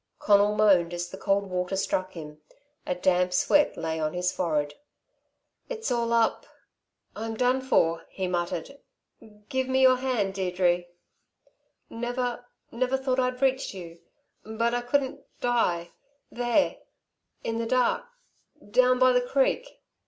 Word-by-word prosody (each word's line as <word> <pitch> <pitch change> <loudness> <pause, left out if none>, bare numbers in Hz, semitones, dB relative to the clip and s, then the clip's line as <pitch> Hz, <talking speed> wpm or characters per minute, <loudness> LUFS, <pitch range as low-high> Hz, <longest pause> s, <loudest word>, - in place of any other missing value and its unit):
Conal 205 0 +4
moaned 185 -5 +4
as 175 0 -4
the - - -6
cold 200 0 +1
water 180 +1 -1
struck 185 -1 -1
him. 150 -2 -10 0.5
A 180 - 0
damp 180 0 +1
sweat 295 +10 +3
lay 160 0 -3
on 155 +1 -2
his 180 0 0
forehead. 150 -5 -1 1.0
"It's 450 - -3
all 235 -1 0
up 230 -1 +1 0.7
I'm 225 +1 -4
done 255 +2 +2
for," 165 -11 +1
he 190 -1 -3
muttered. 175 - -3 0.7
"Give 260 0 -1
me 260 0 +2
your 255 -1 +6
hand, 245 -7 -1
Deirdre 180 -2 0 1.0
never 245 +1 -3 0.2
never 255 +3 0
thought 265 -1 -1
I'd 255 +1 -1
reach 265 -5 +1
you 170 -2 -9 0.4
but 230 +2 -1
I 245 - 0
couldn't 265 +2 -1 0.2
die 180 -9 0 0.4
there 245 +4 +1 0.7
in 225 0 -2
the 230 - -2
dark 255 - +1 0.7
down 255 +2 +4
by 255 0 +5
the 250 0 +3
creek." 275 - -1
225 Hz, 140 wpm, -27 LUFS, 180-255 Hz, 1.0 s, your